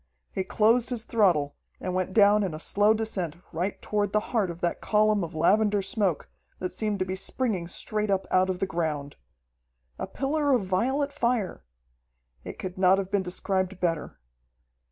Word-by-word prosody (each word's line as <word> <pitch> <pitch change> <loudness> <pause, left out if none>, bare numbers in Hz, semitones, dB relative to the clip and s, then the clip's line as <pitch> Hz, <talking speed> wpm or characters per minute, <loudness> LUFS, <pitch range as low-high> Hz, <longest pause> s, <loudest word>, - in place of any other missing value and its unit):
He 190 - -2
closed 225 +5 +3
his 240 -3 -1
throttle 175 -12 +2 0.2
and 185 - -3
went 185 0 -1
down 205 +1 +5
in 180 -5 -2
a - - -7
slow 205 +6 +3
descent 190 -8 -2
right 180 +4 -2
toward 205 -2 -1
the 210 - +4
heart 210 -6 +2
of 170 0 -7
that 175 - -1
column 210 -2 +2
of 165 -1 -6
lavender 205 +5 +3
smoke 200 - -1 0.3
that 180 - -4
seemed 215 -2 -2
to 185 - -1
be 185 0 -3
springing 195 -2 -2
straight 210 +4 -2
up 195 -1 +1
out 185 0 +3
of 185 - -1
the 195 - 0
ground. 155 -5 -3 0.8
"A - - -3
pillar 285 +1 0
of 235 -6 +2
violet 265 +10 0
fire!" 235 - -1 0.8
It - - -8
could 185 0 -6
not 190 0 +5
have 195 -1 -3
been 200 -1 +2
described 185 +1 -2
better. 165 -4 -2
195 Hz, 175 wpm, -27 LUFS, 180-215 Hz, 0.8 s, down